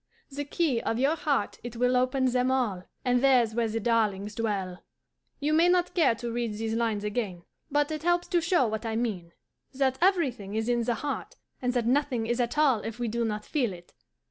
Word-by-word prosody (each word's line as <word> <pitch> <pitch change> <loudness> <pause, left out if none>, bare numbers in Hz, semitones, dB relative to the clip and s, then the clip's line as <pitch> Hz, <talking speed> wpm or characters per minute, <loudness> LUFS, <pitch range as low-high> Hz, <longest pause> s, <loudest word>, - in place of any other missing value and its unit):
The 285 +1 -4
key 285 -5 0
of 225 - -1
your 275 +6 +2
heart 290 -8 -1
it 240 -1 -7
will 250 +2 +2
open 255 +1 +2
them 250 0 +2
all: 225 -9 0 0.2
And 250 -1 +3
there's 250 -5 +4
where 235 0 +1
the 225 +1 -2
darlings 210 -3 0
dwell!'" 200 -5 -2 0.6
You 295 +2 0
may 335 +3 +5
not 360 0 +2
care 300 -10 +3
to 235 +1 -5
read 235 -2 -2
these 220 +1 -3
lines 225 -3 0
again, 210 -5 -3 0.3
but 290 +1 +1
it 310 -1 -3
helps 350 +1 +1
to 350 -3 +2
show 330 -4 +3
what 220 0 -3
I 225 -1 -2
mean: 205 -8 -2 0.4
that 265 -1 +1
everything 265 - +1
is 220 +1 -1
in 240 -1 +1
the 240 - +1
heart, 285 +5 -4 0.3
and 250 -1 0
that 245 -2 0
nothing 255 -2 +1
is 240 +2 -1
at 245 +3 -1
all 280 -7 +4
if 225 +2 -6
we 240 -1 -2
do 235 +2 -1
not 210 -1 -3
feel 250 -10 0
it. 175 -1 -14
240 Hz, 215 wpm, -28 LUFS, 220-275 Hz, 0.6 s, may